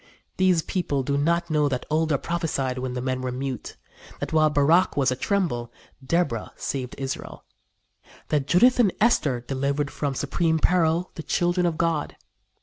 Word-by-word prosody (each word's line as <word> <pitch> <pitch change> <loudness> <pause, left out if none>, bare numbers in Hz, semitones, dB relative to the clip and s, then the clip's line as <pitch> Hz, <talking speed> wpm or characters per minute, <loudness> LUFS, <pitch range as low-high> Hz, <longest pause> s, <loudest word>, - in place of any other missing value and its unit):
These 185 -3 +3
people 145 -7 -1
do 140 +2 -1
not 170 +4 +1
know 150 -2 +2
that 125 -2 -3
Olda 155 -1 +2
prophesied 140 -6 -2
when 125 0 -4
the 125 - -3
men 130 -1 -2
were 130 -1 -3
mute; 130 0 -5 0.4
that - - -4
while 155 -1 +4
Barach 150 +5 +3
was 135 -2 +3
atremble, 130 - -1 0.3
Deborah 140 -6 -1
saved 130 -3 -4
Israel; 135 -1 -6 0.8
that 145 -2 0
Judith 240 - +5
and 215 -6 +5
Esther 150 - +2
delivered 140 +3 -2
from 140 -2 -3
supreme 160 +4 0
peril 170 +1 +2
the - - -6
children 175 +2 +1
of 165 -2 -2
God. 165 -3 -1
150 Hz, 155 wpm, -25 LUFS, 130-170 Hz, 0.8 s, Judith